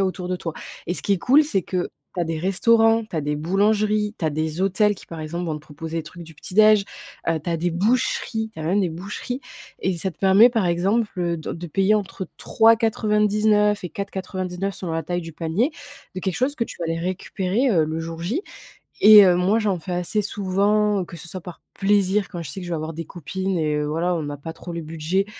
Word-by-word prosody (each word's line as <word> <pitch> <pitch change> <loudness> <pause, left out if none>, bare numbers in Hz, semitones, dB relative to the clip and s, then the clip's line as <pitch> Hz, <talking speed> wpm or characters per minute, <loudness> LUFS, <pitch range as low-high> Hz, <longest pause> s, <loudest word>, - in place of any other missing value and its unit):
a - - +3
autour 185 -1 -3
de 185 - 0
toi. 170 -2 -5 0.4
Et 175 - 0
ce - - -5
qui 200 - +1
est 190 - +1
cool, 275 - +5
c'est 200 - 0
que 180 +1 -2 0.3
tu - - 0
as - - +1
des 165 0 -3
restaurants, 225 +4 +3
tu 215 - -13
as 160 - +1
des 150 0 -2
boulangeries, 210 +5 +1
tu - - -4
as 155 - +2
des 155 +2 -2
hôtels 200 +2 +2
qui, - - -14
par 165 -1 -8
exemple, 170 +3 -4
vont 160 - -2
te 150 - -6
proposer 160 +2 -6
des - - -3
trucs 170 +3 -11
du 160 -1 -14
petit 170 - -9
déj, 215 0 +6 0.5
heu, 165 - +2
tu 155 - -7
as 170 - +1
des 175 +2 -1
boucheries 220 +3 0
tu - - -11
as 155 - -4
même 185 +6 +2
des 185 - +1
boucheries. 200 +9 -5 0.4
Et 185 -2 0
ça 190 +3 -2
te 165 - -19
permet, 195 +5 +6
par 225 -6 +1
exemple, 195 +7 +1
heu, 170 -1 0
do 160 - -5
de 170 +1 -6
payer 195 +6 +2
entre 195 -2 -3
3,99 210 -2 +3
et - - -3
4,99 190 -1 -4
selon 175 -3 -5
la 165 -1 -2
taille 175 +2 -2
du 165 -1 -8
panier, 165 - 0 0.5
de - - -2
quelque 190 -1 -2
chose 270 +3 0
que 230 - 0
tu - - -9
vas 170 - -1
aller 165 - -1
récupérer, 190 +6 -1
heu, 165 -7 +3
le 160 +1 -3
jour 165 0 -6
J. 225 - -2 0.6
Et, 210 -1 +10
heu, 180 -1 +4
moi 185 +5 +2
j'en 205 -5 0
fais 180 +3 -6
assez 180 +4 0
souvent, 205 0 +1
que 170 - -10
ce 160 - -11
soit 185 +2 -6
par 175 -1 -10
plaisir 200 0 +2
quand 175 -3 -5
je 155 - -7
sais 195 - -6
que 180 - -7
je - - -6
vais - - 0
avoir 155 +1 -5
des 165 +1 -5
copines 185 +3 -3
et 155 -2 0
heu, 150 - 0
voilà, 165 +4 0
on 165 - -2
n'a 145 0 -5
pas 160 +4 -7
trop 175 - -9
le 170 - -4
budget, 165 +5 -1
185 Hz, 250 wpm, -23 LUFS, 165-210 Hz, 0.6 s, Et